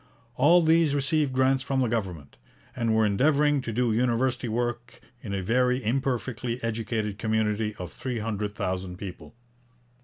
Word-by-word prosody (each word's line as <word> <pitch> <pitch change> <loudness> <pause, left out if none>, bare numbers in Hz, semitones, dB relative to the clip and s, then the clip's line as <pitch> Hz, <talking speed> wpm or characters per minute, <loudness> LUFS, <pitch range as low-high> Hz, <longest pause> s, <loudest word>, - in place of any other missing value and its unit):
All 170 +7 +5
these 160 -2 +3
received 145 0 +1
grants 130 +1 +2
from 135 0 -1
the 130 - +2
government, 95 -11 -4 0.4
and 115 -3 +1
were 110 0 +4
endeavouring 145 +7 +3
to 115 - -4
do 120 0 +1
university 125 +2 +1
work 120 +1 -3 0.2
in 105 - -7
a 100 -1 -2
very 125 +4 +1
imperfectly 125 -1 -1
educated 110 -2 -2
community 110 -1 0
of 90 -6 -8
three 125 -2 -4
hundred 105 -2 -3
thousand 95 -1 -3
people. 95 +3 -9
115 Hz, 150 wpm, -26 LUFS, 105-130 Hz, 0.4 s, All